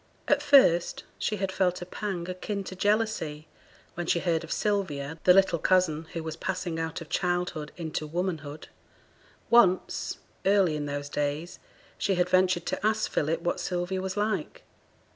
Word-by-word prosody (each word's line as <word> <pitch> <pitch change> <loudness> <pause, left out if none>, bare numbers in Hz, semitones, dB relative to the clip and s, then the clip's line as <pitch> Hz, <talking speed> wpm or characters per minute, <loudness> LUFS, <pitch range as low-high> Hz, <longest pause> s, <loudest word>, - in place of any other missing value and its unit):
At 290 0 +3
first 270 - +4 0.2
she 215 - 0
had 195 -1 -2
felt 180 -1 +1
a - - -8
pang 185 -2 -4
akin 195 +2 -4
to 185 - -7
jealousy 205 -7 0 0.5
when 175 -1 -4
she - - +3
heard 165 -2 0
of 165 - -9
Sylvia, 160 -8 -1
the 180 - +8
little 190 -3 +4
cousin, 165 -3 +2
who 165 - -4
was 160 -1 -4
passing 180 -2 -3
out 160 +1 -3
of 165 - -9
childhood 175 -4 -1
into 160 -2 -4
womanhood. 155 -3 -4 0.8
Once 190 -6 +3 0.3
early 195 -5 +3
in 145 -1 -3
those 145 0 -4
days 145 +3 -3 0.4
she 195 - +1
had 180 0 +1
ventured 185 -1 +3
to - - -3
ask 215 0 +1
Philip 155 +3 0
what 175 0 -1
Sylvia 180 +1 -2
was 190 +1 -4
like. 210 +1 -2
180 Hz, 160 wpm, -28 LUFS, 160-195 Hz, 0.8 s, the